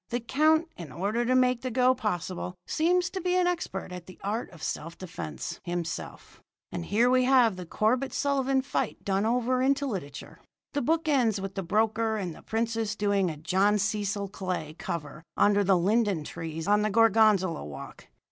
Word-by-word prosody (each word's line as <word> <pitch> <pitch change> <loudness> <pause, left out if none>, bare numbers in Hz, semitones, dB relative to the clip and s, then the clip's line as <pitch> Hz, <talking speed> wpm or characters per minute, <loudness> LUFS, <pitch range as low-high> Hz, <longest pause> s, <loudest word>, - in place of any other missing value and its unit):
The 240 - -1
count 310 +7 +2
in 165 -6 -8
order 210 - -1
to 255 +2 +2
make 250 -1 +3
the 255 - -3
go 255 +1 +4
possible 185 -6 -3
seems 360 +3 +1
to 380 - -4
be 360 +1 +1
an 365 -1 +3
expert 340 - -2
at 180 -1 -8
the 185 - -13
art 215 +4 -2
of 165 -4 -13
self 165 +2 -4
defence, 85 - -6
himself; 175 -1 -5 0.3
and 175 -1 -4
here 220 +7 +3
we 255 0 +4
have 250 -5 +5
the 180 -2 -8
Corbett 245 +9 +1
Sullivan 270 -1 +1
fight 275 - -3
done 195 +2 +1
over 250 +2 +1
into 275 +2 +2
literature. 185 - -6 0.3
The 285 - 0
book 320 +5 +1
ends 240 -8 +2
with 195 0 -5
the 195 - -3
broker 220 +4 +1
and 185 -5 -3
the - - -13
princess 225 -1 -1
doing 200 -3 +1
a 155 - -6
John 190 +6 +2
Cecil 205 -1 -1
Clay 180 -6 -4
cover 150 -2 -5 0.2
under 205 0 +4
the 190 -1 +4
linden 200 -2 +1
trees 160 +1 -6
on 210 +1 +4
the 215 - +1
Gorgonzola 215 -5 +4
Walk. 70 -2 -9
210 Hz, 185 wpm, -28 LUFS, 185-255 Hz, 0.3 s, have